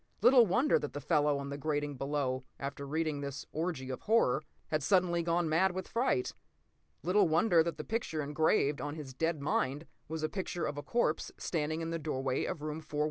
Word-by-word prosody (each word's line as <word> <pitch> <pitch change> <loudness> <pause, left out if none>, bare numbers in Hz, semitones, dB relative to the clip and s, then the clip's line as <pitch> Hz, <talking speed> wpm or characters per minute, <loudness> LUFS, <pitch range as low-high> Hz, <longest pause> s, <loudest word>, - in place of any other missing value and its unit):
Little 245 -3 +7
wonder 250 +11 +3
that 145 - -5
the 145 - -4
fellow 145 0 +2
on 140 0 -5
the 140 0 -5
grating 145 -1 -1
below, 135 -2 -1 0.2
after 140 0 -5
reading 155 -1 -1
this 140 -1 -5
orgy 155 -5 -3
of 130 - -5
horror, 205 - +3 0.3
had 155 -1 0
suddenly 180 +1 +3
gone 170 0 +1
mad 180 +4 +3
with 185 0 -4
fright. 230 - 0 0.7
Little 185 +5 +4
wonder 165 +2 +4
that 170 +1 -2
the - - -4
picture 190 -9 -2
engraved 145 -1 +2
on 145 +1 -4
his 145 -4 -7
dead 160 +1 -1
mind 145 +1 0 0.2
was 160 0 -4
a - - +2
picture 180 -1 -3
of 145 - -2
a - - -4
corpse 195 -5 0
standing 155 -1 -2
in 165 0 -3
the 165 - -2
doorway 135 -4 -1
of 150 - -4
room 155 0 -3
4167! 150 -1 -5
155 Hz, 200 wpm, -32 LUFS, 145-170 Hz, 0.7 s, Little